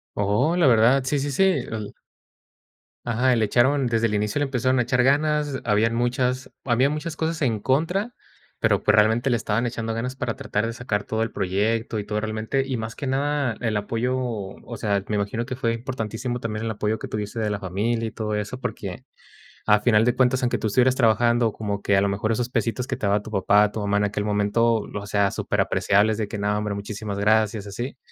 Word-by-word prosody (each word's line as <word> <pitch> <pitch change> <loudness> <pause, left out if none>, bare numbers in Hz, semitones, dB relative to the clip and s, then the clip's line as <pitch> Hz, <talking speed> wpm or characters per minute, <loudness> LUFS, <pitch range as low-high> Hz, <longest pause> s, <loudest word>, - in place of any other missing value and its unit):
Oh, 105 - +1
la 170 -5 +4
verdad, 120 +3 +5
sí, 145 +2 0
sí, 140 +1 -2
sí, 135 - 0
el 110 - -1 1.1
Ajá, 120 +2 +2
y - - +2
le 110 - +3
echaron, 130 +5 +2
desde 115 -1 +1
el 110 - 0
inicio 105 +3 0
le 145 - +1
empezaron 130 -1 0
a 125 - +3
echar 125 +1 +1
ganas. 145 +1 +1
Habían 110 +2 +2
muchas 125 +2 -1
habían 130 +2 +2
muchas 155 +2 -4
cosas 160 0 -2
en 115 -6 +1
contra, 165 - 0 0.5
pero - - +2
pues 105 - +4
realmente 115 +4 +3
le 120 - +3
estaban 110 +2 -1
echando 115 -1 -3
ganas 125 +3 -3
para 120 -3 -3
tratar 105 +2 -2
de 115 - -4
sacar 110 -4 -2
todo 110 +2 -1
el 115 - -4
proyecto 105 +4 -1
y 105 - -2
todo 105 0 -2
realmente. 110 +5 -1
Y 130 -2 -2
más 110 0 -5
que 140 - -5
nada 140 -2 0
el 110 -3 -1
apoyo, 115 +5 -1
o 115 -1 -5
sea, 100 -3 0
me 105 - -1
imagino 105 +4 -2
que 130 - -4
fue 115 -2 0
importantísimo 120 0 -4
también 110 -1 -4
el - - -1
apoyo 105 +1 -2
que - - -6
tuviese 105 +1 -4
de 110 -1 0
la 105 -1 -2
familia 105 +5 -1
y - - -16
todo 105 -1 -3
eso, 105 +4 -4
porque - - -5 0.6
a 105 -1 +5
final 110 0 +3
de 125 - +2
cuentas, 130 +1 +2
aunque 125 - +1
tú 110 - -2
estuvieras 125 +4 +3
trabajando, 120 -1 +3
como 100 -2 -4
que 100 -1 +3
a - - +4
lo 100 - +1
mejor 105 +3 -1
esos 120 +2 -1
pesitos 120 0 -1
que - - -3
te - - -7
daba 100 +1 +2
tu 110 - -9
papá, 105 +1 +3
tu 110 - -5
mamá 100 0 +1
en 105 - +1
aquel 105 0 -2
momento, 105 +3 +2 0.2
o 100 0 -5
sea, 100 -1 +2
súper - - -1
apreciables 105 +2 +2
de 110 -1 -2
que 105 +1 -6
no, 105 +1 0
hombre, 105 0 -2
muchísimas 100 0 -5
gracias, 105 0 +2
así. 120 +7 -6
115 Hz, 220 wpm, -24 LUFS, 105-125 Hz, 1.1 s, verdad